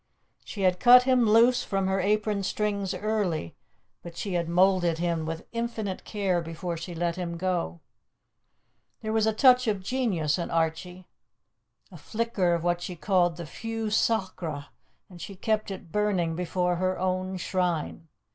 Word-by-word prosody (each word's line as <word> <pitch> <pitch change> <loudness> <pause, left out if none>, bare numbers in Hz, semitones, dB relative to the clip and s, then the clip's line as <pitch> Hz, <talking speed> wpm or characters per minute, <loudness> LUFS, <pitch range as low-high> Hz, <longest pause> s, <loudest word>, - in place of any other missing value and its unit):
She 205 - -7
had 180 -1 +2
cut 250 +2 +8
him 250 -3 +3
loose 235 +3 +5
from 195 -1 -1
her 190 0 0
apron 210 +1 +1
strings 200 -1 -2
early, 190 - -2 0.5
but 170 -1 -10
she 200 - -4
had 170 -1 -1
moulded 180 -1 +3
him 170 -2 -1
with 165 +1 -5
infinite 230 -4 -4
care 195 -5 0
before 165 +1 -5
she 170 +2 -7
let 170 +1 -1
him 170 -2 -4
go. 170 - -2 1.2
There 220 0 -3
was 220 -1 +2
a - - +4
touch 250 +2 +5
of 205 -3 -1
genius 185 - 0
in 170 - -3
Archie, 165 +3 -2 0.8
a - - -11
flicker 215 -6 0
of 165 - -4
what 175 0 0
she 180 0 -5
called 175 -1 +1
the 170 - -6
feu 225 +6 -4
sacré, 190 -9 -1 0.4
and 175 -3 -13
she 200 - -7
had 185 - -19
kept 215 -1 0
it 185 -4 -8
burning 195 -6 0
before 180 0 -1
her 185 +1 0
own 185 0 -2
shrine. 175 -3 -2
185 Hz, 165 wpm, -27 LUFS, 170-210 Hz, 1.2 s, cut